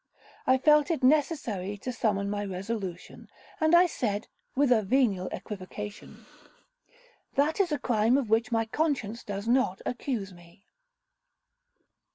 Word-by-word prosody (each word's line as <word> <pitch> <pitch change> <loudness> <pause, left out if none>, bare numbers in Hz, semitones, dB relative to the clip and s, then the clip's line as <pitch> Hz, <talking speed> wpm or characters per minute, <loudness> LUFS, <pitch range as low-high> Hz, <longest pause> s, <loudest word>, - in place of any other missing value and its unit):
I 260 - +5
felt 300 +3 +4
it 320 -6 -1
necessary 255 - +1
to 255 +5 -5
summon 205 -5 0
my 205 0 -2
resolution—and 195 - -3
I 350 +1 +7
said, 220 - -2 0.3
with 275 -1 +3
a 230 -3 +5
venial 205 -4 +1
equivocation, 205 +1 -8 1.1
'That 295 +5 +2
is 370 -4 +2
a 295 - +1
crime 235 -1 +2
of 270 -5 -1
which 225 +2 +1
my 225 -1 +1
conscience 235 -4 -1
does 200 +1 -5
not 240 -6 +2
accuse 235 -6 -3
me? 175 +2 -18
225 Hz, 130 wpm, -28 LUFS, 200-275 Hz, 1.1 s, I